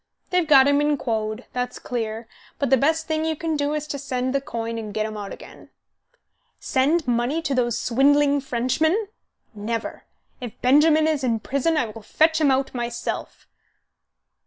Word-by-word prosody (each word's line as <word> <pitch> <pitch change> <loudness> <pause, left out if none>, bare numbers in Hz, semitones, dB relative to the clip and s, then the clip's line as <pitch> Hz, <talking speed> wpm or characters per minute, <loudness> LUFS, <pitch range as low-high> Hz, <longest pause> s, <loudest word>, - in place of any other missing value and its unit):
They've 360 -3 +2
got 275 -3 +7
him 285 0 +3
in 295 0 +1
quod, 220 -1 -3
that's 250 0 -3
clear, 225 -2 -4 0.3
and 280 - -1
the - - +8
best 315 +5 +1
thing 315 0 -1
you 320 0 -1
can 320 +1 -2
do 290 0 -1
is 300 -1 -3
to 290 -2 -5
send 260 -2 -2
the 275 - +1
coin 230 -3 -4
and 215 -2 -6
get 215 0 0
him 215 0 -5
out 205 -2 -6
again." - - -12 0.9
"Send 290 +4 +1
money 245 +6 +1
to 285 -3 -1
those 240 -3 +1
swindling 285 +3 +3
Frenchmen? 310 - 0 0.4
Never! 225 +2 -5 0.3
If 245 -1 -8
Benjamin 305 +4 +4
is 310 -3 0
in 230 -3 +1
prison 275 - 0
I 275 - +2
will 220 0 -9
fetch 315 +8 +2
him 295 - +4
out 270 0 +1
myself." 240 -1 -5
270 Hz, 175 wpm, -23 LUFS, 235-300 Hz, 0.9 s, the